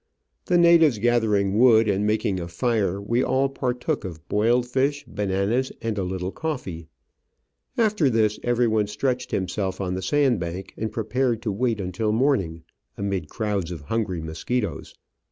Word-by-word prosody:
The 180 - +3
natives 170 -7 +6
gather 115 -1 +2
ing 100 +1 +1
wood 115 -3 +6
and 100 +1 +1
making 105 -3 0
a 85 - -5
fire, 100 +1 0
we 115 +5 0
all 135 +1 +1
partook 130 +2 -2
of 85 -3 -8
boiled 120 +4 +2
fish, 135 +3 0
bananas, 105 +6 -1
and 115 -2 -2
a 100 - -1
little 90 0 -3
coffee. 100 - -5 0.9
After 210 - +3
this, 110 -3 +1
everyone 115 -3 +1
stretched 125 +3 -2
himself 95 0 -2
on 90 -2 -2
the 95 - -3
sand 135 +3 +2
bank 90 +2 -5
and 110 -1 -3
prepared 115 +1 -1
to 110 - -1
wait 115 +2 0
until 95 +3 -1
morning, 100 - +1 0.3
amid 95 -6 -2
crowds 100 -6 -2
of 85 -4 -6
hungry 95 +1 -2
mosquitoes. 100 +8 -3
110 Hz, 155 wpm, -24 LUFS, 95-125 Hz, 0.9 s, natives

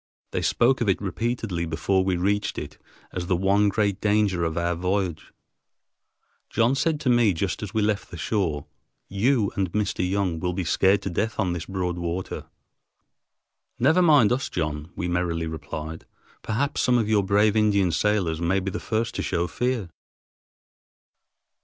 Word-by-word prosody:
They - - -1
spoke 125 +2 +2
of 115 - +1
it 95 - +2
repeatedly 100 -4 -2
before 95 +4 +1
we 95 -1 0
reached 100 +3 0
it - - -7 0.3
as 90 -1 -4
the 90 - +2
one 100 +3 +3
great 100 -1 0
danger 105 -4 +2
of 80 0 -2
our 85 0 +1
voyage. 90 -2 -2 1.2
John 115 +2 +2
said 150 +2 0
to 130 - 0
me 120 -5 +4
just 90 +3 -2
as 105 -2 -6
we 110 - +2
left 105 -1 -1
the 85 - -8
shore, 85 -9 -1 0.4
"You 105 +2 +2
and 95 -3 -1
Mr. 105 -3 0
Young 95 -4 0
will 90 +2 -1
be 95 +1 -2
scared 95 +4 +3
to 95 - -3
death 110 +6 -2
on 95 -4 +1
this 85 -2 -5
broad 90 -2 -2
water." 85 +2 -4 1.3
"Never 155 +8 +4
mind 145 - +5
us, 130 +3 0
John," 75 -2 -3
we 90 - -3
merrily 85 -2 -1
replied, 80 0 -6 0.3
"perhaps 120 +6 -1
some 125 -1 +3
of 115 -3 +1
you 110 -2 +3
brave 100 +2 +3
Indian 100 -4 +3
sailors 90 -3 0
may 90 +3 +2
be 95 +1 -3
the - - -4
first 115 +1 -2
to - - -3
show 85 - 0
fear." 120 +5 -1
95 Hz, 170 wpm, -25 LUFS, 85-110 Hz, 1.3 s, mind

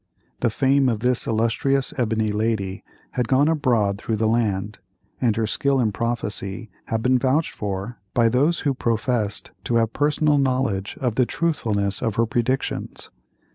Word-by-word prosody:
The 120 - +2
fame 135 +3 +3
of 115 -3 -1
this 125 0 +1
illustrious 115 +5 +1
ebony 110 -3 0
lady 105 -2 -1 0.3
had 125 -2 -1
gone 135 +4 +4
abroad 120 -11 +1
through 110 - -2
the 110 +1 +1
land, 105 -3 0 0.4
and 115 -4 +2
her 115 -1 0
skill 135 +5 +1
in 115 -4 +2
prophecy 110 -2 -3
had 110 0 -2
been 130 0 +3
vouched 140 +5 +1
for 100 +3 -5 0.2
by 115 -1 +4
those 140 +9 +2
who 140 - +1
professed 115 -3 -1
to 120 - 0
have 115 -1 +2
personal 150 0 +2
knowledge 125 -7 0
of 125 -4 -1
the 125 -2 +3
truthfulness 105 -12 -1
of 110 -2 -1
her 115 - +3
predictions. 120 +3 -2
115 Hz, 160 wpm, -23 LUFS, 110-130 Hz, 0.4 s, gone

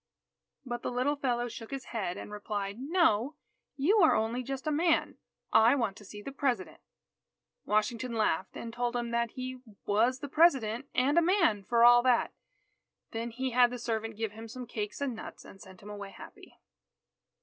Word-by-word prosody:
But 240 -1 -4
the - - -2
little 255 +4 +1
fellow 245 -4 -1
shook 225 -1 -9
his 270 -1 -6
head, 190 -6 -2
and - - -8
replied: 205 -1 -4
"No, 285 - +2 0.4
you 365 +11 +3
are 330 - +6
only 225 +3 0
just 270 +1 -5
a 310 - 0
man. 325 +2 +1 0.3
I 225 +4 +6
want 230 -7 -1
to - - -13
see 205 +2 -10
the 275 - -6
President." 255 -9 -2 0.9
Washington 230 +4 0
laughed, 190 -5 0
and 230 -1 -7
told 240 0 -2
him 240 -1 -2
that 235 -1 0
he 255 0 -6 0.3
was 230 +5 +2
the 285 - -6
President 270 -6 +3
and 280 +6 +4
a - - +3
man 335 - +2
for 235 +3 +2
all 240 0 +8
that. 250 -1 +2 0.8
Then 230 0 -3
he 255 +3 -3
had 245 0 +5
the 250 - -5
servant 225 -2 -3
give 225 -2 -2
him 225 +2 -9
some 250 +2 -7
cakes 215 +1 -5
and 275 -3 -1
nuts, 220 - -9
and 195 - -14
sent 190 0 -14
him 205 - -10
away 205 -1 -7
happy. - - -14
240 Hz, 185 wpm, -30 LUFS, 220-265 Hz, 0.9 s, all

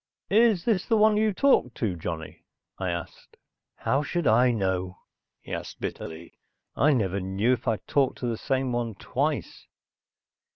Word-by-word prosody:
"Is 215 -4 +4
this 210 -6 +1
the 225 - +3
one 215 0 +5
you 215 0 +2
talked 195 - +3
to, 105 -6 -1
Johnny?" 80 -1 -6 0.4
I 95 -1 -1
asked. 85 -1 -7 0.4
"How 135 - 0
should 170 +3 -2
I 120 +3 +5
know?" 95 -5 -1 0.5
he - - -8
asked - - -6
bitterly. 80 +1 -7 0.4
"I 145 +6 +4
never 100 -7 +1
knew 95 +6 +1
if 125 0 -4
I 115 -2 +2
talked 140 -3 +1
to - - -5
the 120 -1 -1
same 130 +2 -1
one 120 -3 -2
twice." - - -3
120 Hz, 160 wpm, -26 LUFS, 95-155 Hz, 0.5 s, one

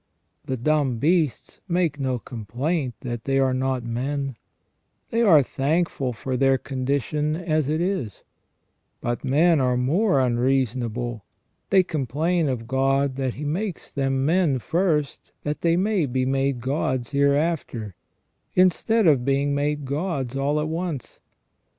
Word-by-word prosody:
The 130 - -2
dumb 140 -1 +1
beasts 155 +1 0
make 170 -5 0
no 130 -2 0
complaint 125 - -3
that 120 -3 -5
they 135 0 +1
are 135 -1 +3
not 130 -1 -1
men, 135 +3 -3 0.8
they 230 - +1
are 165 -11 +6
thankful 140 0 -1
for 130 +3 -4
their 135 +1 +3
condition 140 +4 -1
as 155 -4 0
it 155 +1 0
is; 175 - -2 0.8
but 120 0 -3
men 160 +4 +4
are 125 -1 +2
more 155 - +2
unreasonable, 120 -2 0 0.5
they 190 -1 +5
complain 155 +2 0
of 115 -3 -3
God 135 +1 +1
that 130 -2 -2
He 150 - -5
makes 180 +5 -3
them 135 -1 0
men 165 -3 +2
first 155 +1 -1
that 150 +1 -3
they 170 0 +3
may 190 -4 +1
be 130 0 0
made 135 -1 0
gods 130 -2 -1
hereafter, 140 - 0 0.6
instead 185 +5 +3
of 145 -7 +4
being 140 +2 +1
made 145 0 -1
gods 140 -3 -2
all 140 +2 +1
at 150 - -1
once. 165 -4 -4
140 Hz, 140 wpm, -24 LUFS, 130-160 Hz, 0.8 s, are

